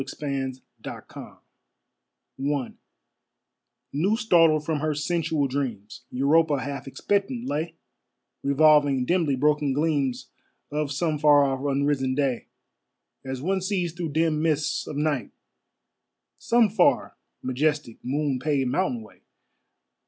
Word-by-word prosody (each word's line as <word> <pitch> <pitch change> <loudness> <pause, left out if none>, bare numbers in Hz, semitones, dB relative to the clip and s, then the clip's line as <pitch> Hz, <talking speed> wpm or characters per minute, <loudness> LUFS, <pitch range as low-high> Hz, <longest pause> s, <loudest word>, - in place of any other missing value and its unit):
Sebastian 135 -3 -3 0.3
Cabot - - -9 1.0
I 140 -1 -1 1.2
New 190 +10 +1
startled 165 -9 +4
from 155 -1 -1
her 155 0 -1
sensual 160 -1 0
dreams, 125 -7 -4
Europa 145 +3 +2
half 140 0 -5
expectant 205 - -1
lay, 160 - -3 0.7
Revolving 140 -2 +4
dimly 165 -3 +1
broken 145 0 +2
gleams 140 -4 -1 0.4
Of 150 -1 -2
some 155 +1 -1
far 145 -1 +6
off 135 -1 -1
unrisen 140 -1 0
day, 135 -4 -1 0.8
As 130 0 -5
one 190 +2 0
sees 180 -3 -1
through 170 -4 -4
dim 160 -1 +1
mists 155 -2 0
of 150 - -5
night 150 -3 0 1.1
Some 235 -1 +3
far, 210 +2 +2 0.3
majestic, 140 -1 -1
moon 140 0 -1
paved 135 -3 0
mountain 130 -11 -1
way. 105 - -18
150 Hz, 115 wpm, -25 LUFS, 135-160 Hz, 1.2 s, far